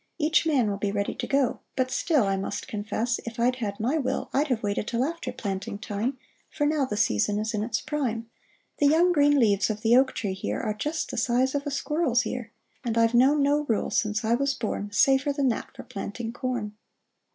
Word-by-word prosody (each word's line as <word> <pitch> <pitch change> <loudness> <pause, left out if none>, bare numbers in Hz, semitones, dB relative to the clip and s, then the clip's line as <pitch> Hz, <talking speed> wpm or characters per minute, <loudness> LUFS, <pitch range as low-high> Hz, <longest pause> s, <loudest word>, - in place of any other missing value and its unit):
Each 315 +1 +2
man 270 -8 +3
will 200 -1 -2
be 205 -1 -1
ready 200 0 -1
to - - -5
go; 275 -3 +1 0.2
but 255 -1 0
still, 300 -5 +2
I 195 -1 +1
must 195 +1 -4
confess, 215 +3 -2
if 230 +1 -7
I'd 250 +2 +2
had 205 -5 -4
my 260 +9 +1
will, 265 -1 -2
I'd 290 +3 +2
have 250 -5 -1
waited 205 +1 -1
till 235 +1 0
after 335 +4 -3
planting 195 -1 -4
time. 225 +4 -3 0.3
For 295 - -1
now 295 -2 +2
the 210 -5 -4
season 155 - +2
is 220 +2 -2
in 210 - -1
its 225 +2 -1
prime. 235 -7 -2 0.5
The 290 - +5
young 335 +5 +4
green 290 -3 +4
leaves 205 -4 +3
of 215 -1 -3
the 230 +1 +5
oak 260 +1 +4
tree 200 -4 -2
here 110 - -3
Are 215 - -1
just 300 +9 -3
the - - -5
size 255 +2 +2
of 285 0 -2
a - - -2
squirrel's 280 -3 +1
ear; 240 -3 -5 0.3
And 230 -2 -1
I've 230 0 +4
known 275 +4 +5
no 290 +1 +2
rule, 225 -6 0
since 210 0 0
I 225 - +2
was 275 +3 +1
born, 205 -2 -3
Safer 270 +6 +3
than 280 -2 +1
that 230 - -3
for - - -8
planting 225 +3 -6
corn 245 -5 -3
240 Hz, 220 wpm, -26 LUFS, 210-280 Hz, 0.5 s, The